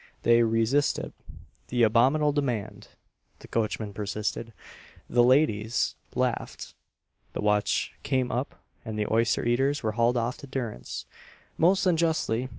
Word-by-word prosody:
They 115 0 +5
re 115 0 +2
sisted 140 +6 0 0.6
the 120 -1 +1
"abominable 130 +7 +4
demand," 125 -8 -3 0.5
the - - -14
coachman 110 -2 -2
per 105 0 -5
sisted, 105 +3 -3 0.6
the 120 - +4
ladies 120 -4 +2 0.2
laughed, - - -2 0.6
the - - -3
watch 105 0 +1
came 130 -2 0
up, 125 +4 -3 0.3
and 110 -2 -5
the 105 - 0
oyster 115 +1 +2
eaters 135 +4 +1
were 110 - 0
hauled 120 +2 +2
off 120 +2 -1
to 140 - -11
durance, 120 - -5 0.5
most 185 +4 +3
unjustly. 160 -8 +1
120 Hz, 135 wpm, -27 LUFS, 110-135 Hz, 0.6 s, They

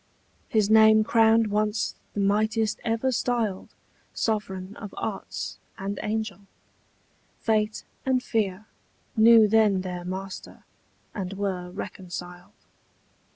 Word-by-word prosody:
His 215 -5 +2
name 220 0 +6
crowned 225 -1 +4
once 210 +1 0 0.2
the - - -2
mightiest 215 +2 +1
ever 230 +3 0
styled 230 -5 -1 0.4
Sovereign 200 -3 -2
of 205 -3 -9
arts, - - -5 0.2
and 195 +1 -4
angel: 210 -2 -3 0.9
fate 215 -1 0 0.2
and 260 -1 +1
fear 210 -3 -1 0.5
Knew 225 0 +7
then 210 -3 +3
their 180 -1 -5
master, 190 +1 -7 0.5
and 195 -3 -4
were 190 -3 -3
reconciled. 180 -1 -8
210 Hz, 105 wpm, -26 LUFS, 190-220 Hz, 0.9 s, Knew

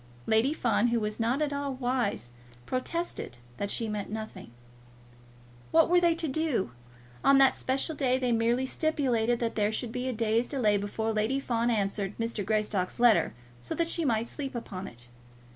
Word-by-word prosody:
Lady 220 +5 +3
Fawn, 240 -6 +2
who 235 0 +1
was 210 0 -3
not 245 +6 +1
at 290 -1 -1
all 280 -1 -2
wise, 245 - -1 0.3
protested 255 - -3 0.2
that 200 - -2
she 230 - +1
meant 210 -2 -4
nothing. 220 - -6 1.2
What 325 0 +4
were 355 0 +6
they 340 -1 +4
to 330 -1 -1
do? 285 - 0 0.5
On 275 0 +6
that 270 -1 +6
special 270 +5 -1
day 260 -4 +1
they 250 -2 0
merely 235 +3 +2
stipulated 260 -6 +1
that 230 -1 0
there 210 -1 +1
should 225 +1 -3
be 250 +1 -3
a - - 0
day's 225 +1 +1
delay 230 -7 +2
before 215 +2 -2
Lady 220 +6 +1
Fawn 235 -3 0
answered 200 -2 -1
Mrs. 230 -2 -2
Greystock's 210 -2 0
letter, 235 - +4 0.3
so 120 - -4
that 335 -1 0
she 335 - 0
might 230 -4 +1
sleep 275 -1 -6
upon 195 -5 -5
it. 120 +1 -9
235 Hz, 175 wpm, -29 LUFS, 215-270 Hz, 1.2 s, were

